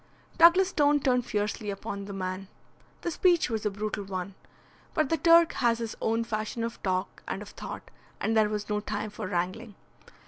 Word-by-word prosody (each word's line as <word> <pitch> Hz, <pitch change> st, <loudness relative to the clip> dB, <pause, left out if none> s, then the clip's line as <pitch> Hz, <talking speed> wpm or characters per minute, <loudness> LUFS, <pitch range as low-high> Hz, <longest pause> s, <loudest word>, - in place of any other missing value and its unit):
Douglas 355 Hz, +3 st, +7 dB
Stone 290 Hz, -3 st, +3 dB
turned 250 Hz, -2 st, +2 dB
fiercely 210 Hz, -1 st, -2 dB
upon 200 Hz, 0 st, -5 dB
the 200 Hz, -, -7 dB
man. 185 Hz, 0 st, -4 dB, 0.5 s
The 345 Hz, -, -2 dB
speech 345 Hz, -5 st, +3 dB
was 220 Hz, -1 st, -1 dB
a -, -, +2 dB
brutal 210 Hz, +1 st, -4 dB
one. 190 Hz, 0 st, -5 dB, 0.6 s
But 310 Hz, -4 st, +2 dB
the 325 Hz, -, +2 dB
Turk 335 Hz, 0 st, +6 dB
has 235 Hz, -2 st, +2 dB
his 230 Hz, -2 st, -4 dB
own 225 Hz, +1 st, +1 dB
fashion 220 Hz, 0 st, -3 dB
of 230 Hz, 0 st, -5 dB
talk 185 Hz, 0 st, -2 dB
and -, -, -3 dB
of -, -, -12 dB
thought, -, -, -8 dB, 0.3 s
and 225 Hz, -, 0 dB
there 215 Hz, -1 st, +4 dB
was 210 Hz, -1 st, -3 dB
no 210 Hz, 0 st, 0 dB
time 210 Hz, 0 st, -4 dB
for 195 Hz, -, -5 dB
wrangling. 185 Hz, +5 st, -3 dB
215 Hz, 185 wpm, -28 LUFS, 200-250 Hz, 0.6 s, Douglas